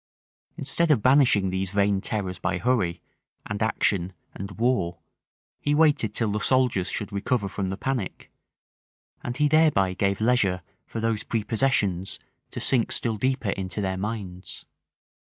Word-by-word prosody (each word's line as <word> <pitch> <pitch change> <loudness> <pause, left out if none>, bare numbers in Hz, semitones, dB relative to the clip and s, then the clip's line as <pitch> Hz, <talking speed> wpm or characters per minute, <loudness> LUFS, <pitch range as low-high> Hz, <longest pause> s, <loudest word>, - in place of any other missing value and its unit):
Instead 160 +5 0
of 130 -9 +3
banishing 125 -8 +4
these 95 0 -1
vain 100 0 +1
terrors 95 -4 -3
by 95 0 -1
hurry, 95 -6 0 0.4
and 105 +1 -5
action, 95 -4 0 0.2
and 100 +1 -6
war, 115 -8 0 0.6
he 145 0 0
waited 145 -8 +3
till 110 -1 +1
the 105 - -1
soldiers 125 -6 +2
should 105 0 -4
recover 100 +1 0
from 95 0 -3
the 95 - -4
panic; 125 -4 -4 0.9
and 120 0 -4
he 150 - +3
thereby 145 -12 +3
gave 100 +1 0
leisure 110 -6 +2 0.2
for 115 - -5
those 110 -1 -1
prepossessions 105 -4 0 0.3
to - - -6
sink 120 -4 +3
still 115 -2 +1
deeper 130 -1 0
into 95 +1 -4
their 95 -2 -1
minds. 95 -2 -6
105 Hz, 145 wpm, -25 LUFS, 95-125 Hz, 0.9 s, banishing